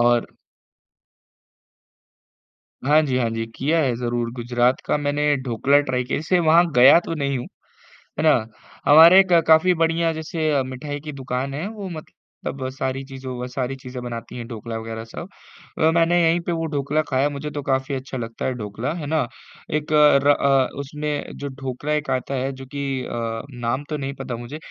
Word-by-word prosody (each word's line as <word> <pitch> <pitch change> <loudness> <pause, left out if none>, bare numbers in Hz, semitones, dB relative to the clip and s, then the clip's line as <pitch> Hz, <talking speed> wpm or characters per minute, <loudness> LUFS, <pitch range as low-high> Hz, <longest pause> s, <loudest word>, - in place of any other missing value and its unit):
और 120 0 +3 2.6
हाँ 150 +3 +5
जी, 130 -3 0
हाँ 120 -2 +1
जी, 115 0 -3
किया 155 +5 +1
है 130 -6 +1
ज़रूर, 120 -1 -2
गुजरात 120 +1 +1
का - - +1
मैंने 145 0 +1
ढोकला 130 +3 +3
ट्राई 130 -3 -1
किया 125 - -2
है। - - -4
जैसे 180 +3 +2
वहाँ 170 +2 +6
गया 130 +6 +8
तो - - -3
नहीं 140 -3 -1
हूँ, 120 - -5 0.7
है - - +1
ना। 155 - +6 0.5
हमारे 165 +5 +9
एक 185 -2 +4
अ, 170 - +6
काफ़ी 160 +3 +6
बढ़िया 165 0 +1
जैसे 160 0 -2
अ, 140 -2 +2
मिठाई 145 +3 -6
की 150 +1 -7
दुकान 135 0 -3
है, 160 +8 -3
वो 210 -3 -7
मतलब 160 -3 -8 0.6
सारी 130 0 -3
चीजों 130 -1 -7
वो 125 - -5
अ, - - -4
सारी 125 +1 -3
चीज़े 130 -1 -8
बनाती 120 0 -7
हैं, 120 -1 -6
ढोकला 115 -1 -6
वगैरह 110 0 -6
सब। 170 +9 -8 0.5
अ, 160 +1 +4
मैंने 170 +1 +3
यही 165 +1 +3
पे 175 0 -4
वो 165 -1 -1
ढोकला 145 +2 +1
खाया, 135 +2 +2
मुझे 145 +1 -5
तो 145 - -4
काफ़ी 135 0 -1
अच्छा 130 0 -6
लगता 115 -1 -5
है 130 - 0
ढोकला, 115 +4 -4
है 165 -3 -5
ना। 155 -4 0 0.5
एक 155 +1 -2 0.3
र 145 - +4
अ, 135 -2 +4
उसमे 150 +2 -4 0.2
जो 140 - -5
ढोकला 135 +3 -3
एक 150 0 -1
आता 130 +1 -2
है, 135 +1 -1
जो 135 0 -10
की 135 -1 -3
अ, 115 -1 -3
नाम 120 +3 -2
तो 155 - -2
नहीं 135 -1 -4
पता 120 - -4
मुझे 120 +5 -7
135 Hz, 195 wpm, -22 LUFS, 125-155 Hz, 2.6 s, हमारे